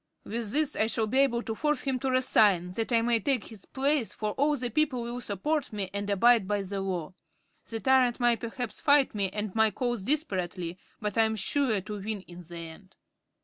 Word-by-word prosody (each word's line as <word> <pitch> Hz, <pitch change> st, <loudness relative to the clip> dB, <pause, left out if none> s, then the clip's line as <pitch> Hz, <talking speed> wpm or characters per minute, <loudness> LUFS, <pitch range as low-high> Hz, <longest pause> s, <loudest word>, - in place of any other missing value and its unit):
With 225 Hz, -1 st, -4 dB
this 300 Hz, +2 st, +2 dB
I 220 Hz, -, +2 dB
shall 225 Hz, -1 st, 0 dB
be 255 Hz, +5 st, 0 dB
able 240 Hz, -4 st, +2 dB
to 225 Hz, -, -3 dB
force 295 Hz, +3 st, 0 dB
him 265 Hz, -2 st, -1 dB
to 265 Hz, -, -1 dB
resign, 210 Hz, -8 st, +3 dB
that 225 Hz, +6 st, -3 dB
I 230 Hz, -1 st, +3 dB
may 235 Hz, -1 st, +3 dB
take 255 Hz, +1 st, 0 dB
his 215 Hz, -4 st, -10 dB
place, 275 Hz, -2 st, 0 dB
for 215 Hz, -1 st, -3 dB
all 290 Hz, +5 st, +1 dB
the 245 Hz, -2 st, -3 dB
people 275 Hz, -2 st, +1 dB
will 240 Hz, +1 st, -5 dB
support 270 Hz, -, -2 dB
me 200 Hz, -3 st, -4 dB
and 200 Hz, 0 st, -3 dB
abide 220 Hz, +1 st, +4 dB
by 205 Hz, -1 st, 0 dB
the 195 Hz, +1 st, -4 dB
Law. 185 Hz, -4 st, -3 dB, 0.5 s
The 225 Hz, -, -4 dB
tyrant 260 Hz, -2 st, +3 dB
will 240 Hz, -1 st, +4 dB
perhaps 230 Hz, +1 st, -5 dB
fight 285 Hz, -2 st, +4 dB
me 200 Hz, -2 st, 0 dB
and 210 Hz, 0 st, -4 dB
my 220 Hz, 0 st, +4 dB
cause 240 Hz, -1 st, -2 dB
desperately, 185 Hz, -, -2 dB, 0.2 s
but 210 Hz, 0 st, -2 dB
I -, -, +7 dB
am 220 Hz, 0 st, -1 dB
sure 220 Hz, 0 st, +2 dB
to 205 Hz, +2 st, -6 dB
win 210 Hz, 0 st, -4 dB
in 175 Hz, -1 st, -12 dB
the 170 Hz, 0 st, -10 dB
end." 165 Hz, +3 st, -11 dB
225 Hz, 215 wpm, -28 LUFS, 200-255 Hz, 0.5 s, I